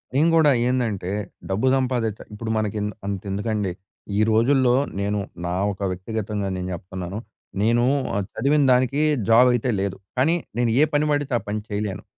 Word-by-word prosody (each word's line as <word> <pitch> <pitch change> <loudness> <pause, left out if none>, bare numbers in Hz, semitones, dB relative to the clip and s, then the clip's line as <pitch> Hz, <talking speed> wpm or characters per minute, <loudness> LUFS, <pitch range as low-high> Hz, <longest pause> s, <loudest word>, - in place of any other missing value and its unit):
నేను 160 +4 +4
కూడా 155 -3 +5 0.2
ఏందంటే 110 -8 -1 0.4
డబ్బు 105 +7 +1
సంపాదిచా 125 -5 -1
ఇప్పుడు 110 +2 -5
మనకి 110 -1 -1
ఇంద 105 - -2
అంత 100 -2 -3
ఎందుకండీ. 105 -1 -1 0.5
ఈ - - +2
రోజుల్లో 125 +2 +4 0.3
నేను 100 +1 0 0.3
నా 90 - -2 0.2
ఒక 100 - -14
వ్యక్తిగతంగా 105 +2 -3
నేను 90 0 -4
జెప్తున్నాను. 90 +2 -6 0.4
నేను 115 +3 +3 0.3
ఆహ్, 100 - -1
చదివిన 145 +4 +2
దానికి 130 +3 +2 0.3
జాబ్ 125 +3 +7
అయితే 120 +1 0
లేదు. 100 0 -2 0.2
కానీ 155 +7 +3 0.2
నేను 120 -2 +2
ఏ - - +7
పని 145 +1 +3
బడితే 145 -2 0
ఆ - - -12
పని 105 +1 -1
చేయలేను. 105 -1 -3
110 Hz, 165 wpm, -23 LUFS, 100-130 Hz, 0.5 s, జాబ్